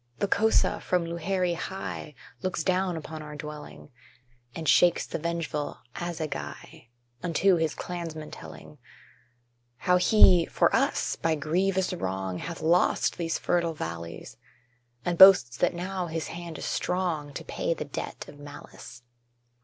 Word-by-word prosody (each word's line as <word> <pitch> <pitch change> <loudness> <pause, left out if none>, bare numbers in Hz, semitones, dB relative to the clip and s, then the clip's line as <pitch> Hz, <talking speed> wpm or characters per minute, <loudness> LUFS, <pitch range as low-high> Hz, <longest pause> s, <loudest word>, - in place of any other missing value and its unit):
The 205 - 0
Kosa 220 +3 +2
from 180 -2 0
Luhéri 175 +1 -1
high 165 -4 -6 0.3
Looks 185 -3 -2
down 185 -1 +1
upon 160 0 -7
our 150 -1 -8
dwelling, 150 -1 -9 0.6
And 160 -1 -5
shakes 175 -1 +5
the - - -4
vengeful 165 -2 -3 0.2
assegai, 155 - -6 0.3
Unto 180 +2 +3
his 160 -2 0
clansmen 165 -3 -6
telling - - -11 1.0
How 180 +4 +3
he, 180 -3 +6
for - - +2
us, - - +1
by 165 -1 +1
grievous 185 +5 0
wrong, 95 - -3
Hath 170 0 -6
lost 170 +2 +2
these 165 -1 -1
fertile 170 -2 0
valleys, 85 - -6 0.7
And 175 -1 -1
boasts 180 -12 +9
that - - +1
now 180 0 -3
his 165 -1 -4
hand 170 -2 -7
is - - -6
strong 175 -5 -1
To - - -5
pay 165 - -2
the 150 - -5
debt 145 - -6
of 145 0 -13
malice. 145 -4 -11
165 Hz, 140 wpm, -27 LUFS, 150-180 Hz, 1.0 s, boasts